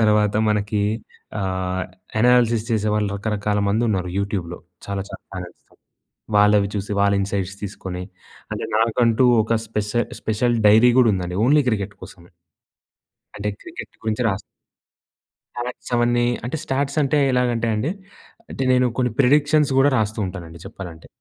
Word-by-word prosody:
తర్వాత 105 -1 +3
మనకి 105 0 0 0.6
ఆహ్, 95 -1 -2 0.4
అనాలిసిస్ 120 -2 +3
చేసేవాళ్ళు 105 -1 +1
రకరకాల 105 0 -1
మంది 110 +4 +1
ఉన్నారు 90 -4 -1
యూట్యూబ్‌లో 95 -4 -3 0.3
చాలా 100 -1 -3
చాలా - - -9
చానల్స్. 90 -2 -8 0.7
వాళ్ళవి 105 -1 +4
చూసి 100 0 -3
వాళ్ళ 100 0 +3
ఇన్సైట్స్ 100 -1 -2
తీసుకొని, 95 -2 -5 0.5
అంటే - - -4
నాకంటూ 115 +2 +3 0.2
ఒక 115 - -2
స్పెస 105 -1 -3 0.3
స్పెషల్ 120 +2 0
డైరీ 110 +4 +7
కూడా 120 -3 +6
ఉందండి 90 -1 -3
ఓన్లీ 150 +1 +5
క్రికెట్ 100 -2 -2
కోసమే. 85 0 -13 1.0
అంటే 105 0 -3
క్రికెట్ - - -9
గురించి 110 +2 -1
రాస్ 95 0 -2 1.1
స్టాట్స్ 120 +1 -6
అవన్నీ 120 0 +2 0.2
అంటే 125 +6 -3
స్టాట్స్ 140 +2 -1
అంటే 145 +2 +2
ఎలాగంటే 120 -2 +1
అండి 130 +10 -1 0.6
అంటే 135 - -3
నేను 125 0 +4
కొన్ని 125 -3 +1
ప్రిడిక్షన్స్‌స్ 145 +1 +3
కూడా 135 - +5
రాస్తూ 110 +1 -1
ఉంటానండి 85 -3 -8
చెప్పాలంటే. 85 -4 -9
105 Hz, 135 wpm, -22 LUFS, 100-120 Hz, 1.1 s, డైరీ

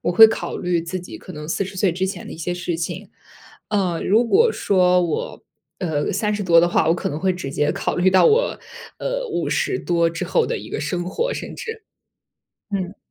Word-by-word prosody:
我 - - 0
会 220 +5 +10
考 220 - -3
虑 175 -2 0
自 170 +3 -4
己 180 - -9
可 185 - -11
能 150 -1 -7
40 190 +4 -3
岁 185 -1 +2
之 185 +2 -1
前 190 - -6
的 - - -8
一 - - -8
些 170 +2 -3
事 175 -1 -3
情。 165 0 -5 0.6
呃， 190 -5 0
如 220 +5 +3
果 450 - +4
说 180 -2 +3
我， 165 -3 -3 0.4
呃， 155 -4 -1
30 210 -1 -1
多 170 -2 +6
的 175 - +3
话 170 - +2
我 165 - +4
可 175 - -3
能 150 - -4
会 190 0 +2
直 180 -7 -5
接 150 +2 +1
考 - - -2
虑 180 +1 +3
到 185 0 +5
我， - - +2 0.4
呃， - - -2
50 385 - -1
多 170 -1 +1
之 170 0 -4
后 475 - +1
的 - - -2
一 - - -9
个 - - -3
生 175 -1 -2
活 475 - -1
甚 - - -6
至。 450 -2 -7 0.9
嗯。 195 -1 -3
180 Hz, 215 characters per minute, -21 LUFS, 170-210 Hz, 0.9 s, 会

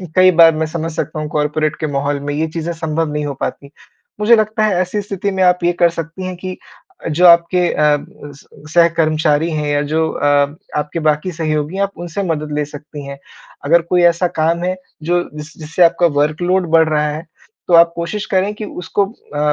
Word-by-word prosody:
कई 185 0 +6
बार 165 -2 +6
मैं 160 +1 -1
समझ 165 +1 -4
सकता 155 - -4
हूँ, 155 - -3
कॉर्पोरेट 150 +1 -1
के 155 - -2
माहौल 140 0 -1
में 145 +1 -4
ये 155 +2 -1
चीज़ें 165 +1 -3
संभव 160 -1 -2
नहीं 150 0 -2
हो 145 - -3
पाती। 140 0 -5 0.5
मुझे 220 +3 +5
लगता 215 0 0
है, 215 -2 +2
ऐसी 185 +3 -2
स्थिति 200 0 -3
में 190 -1 0
आप 180 -1 +3
ये 175 - +3
कर 175 0 +3
सकती 165 +2 -6
हैं 185 -1 -4
कि 185 0 -6 0.5
जो 175 +4 +3
आपके 170 +1 +4
अ, 150 -1 +3 0.4
स 140 - -18 0.3
सह 170 -1 +6
कर्मचारी 155 0 +2
हैं 150 -1 -2
या 145 0 +1
जो 160 0 +1
अ, 145 0 +1 0.2
आपके 150 +3 -3
बाकी 155 +3 0
सहयोगी 155 0 -2
हैं, 200 - +1
आप 200 - -2
उनसे 175 +3 -4
मदद 155 -3 -3
ले 150 - 0
सकती 145 0 -10
हैं। 140 0 -8 0.5
अगर 170 +4 +4
कोई 175 +2 +1
ऐसा 175 +1 +3
काम 165 +1 0
है, 185 +1 -1 0.3
जो 175 +2 +1
जिस 150 0 -10
जिससे 160 +3 +1
आपका 170 +1 +3
वर्कलोड 175 +5 +1
बढ़ 160 -1 +5
रहा 150 -1 +1
है, 155 +3 -6 0.4
तो 175 - 0
आप 170 0 +6
कोशिश 170 +5 -4
करें 190 +2 +1
कि 215 - -6
उसको 195 +2 -2 0.3
अ, - - -1
165 Hz, 210 wpm, -17 LUFS, 150-180 Hz, 0.5 s, कई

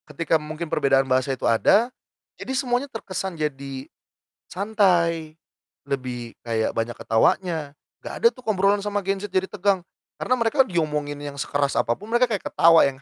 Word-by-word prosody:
Ketika 160 +1 0
mungkin 155 +2 -5
perbedaan 135 -4 +3
bahasa 130 0 +1
itu - - -5
ada, 220 - +3 0.5
jadi 265 - -4
semuanya 255 +1 0
terkesan 190 -6 -5
jadi 135 -3 -4 0.6
santai, 175 -6 +1 0.5
lebih 125 -4 -4
kayak 115 -1 -1
banyak 115 +1 -1
ketawanya, 160 +11 +1 0.5
gak - - -6
ada 465 - +7
tuh 255 - -17
obrolan 200 -1 +2
sama 205 0 -1
gen 195 +1 -1
Z 200 0 -7
jadi 190 0 +1
tegang, 200 -2 +1 0.4
karena 255 - +1
mereka 235 +4 +3
diomongin 150 - -1 0.2
sekeras 140 -1 0
apapun 200 - -1
mereka 240 +1 +4
kayak 210 -4 -3
ketawa 165 0 +6
yang 135 -1 -3
170 Hz, 150 wpm, -24 LUFS, 140-205 Hz, 0.6 s, ada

